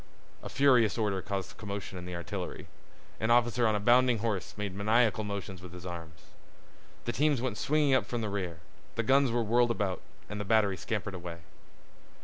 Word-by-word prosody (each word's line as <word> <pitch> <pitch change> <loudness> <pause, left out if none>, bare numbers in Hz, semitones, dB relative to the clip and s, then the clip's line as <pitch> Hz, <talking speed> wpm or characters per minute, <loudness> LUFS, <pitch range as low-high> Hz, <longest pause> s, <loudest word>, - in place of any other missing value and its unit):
A - - -7
furious 125 -6 +4
order 105 -4 0
caused 100 -1 -4
commotion 100 -2 -5
in 90 -1 -6
the 90 - -5
artillery. 85 -3 -5 0.5
An 110 - 0
officer 120 0 +4
on 110 - +2
a - - +1
bounding 120 +2 +5
horse 100 -5 -3
made 105 -2 -3
maniacal 110 +2 +2
motions 100 -3 -5
with 90 -1 -10
his 90 0 -9
arms. 85 -3 -7 0.8
The 120 - 0
teams 145 +2 +2
went 125 -3 -2
swinging 150 -2 +2
up 130 - +3
from 120 -1 -2
the 110 - -2
rear, 90 -5 -4 0.3
the 115 - 0
guns 135 +2 +4
were 120 0 +1
whirled 120 +2 +3
about, 100 -6 -1 0.3
and 105 0 -5
the - - -2
battery 105 -1 +3
scampered 100 0 -3
away. 85 -2 -7
105 Hz, 185 wpm, -30 LUFS, 95-120 Hz, 0.8 s, bounding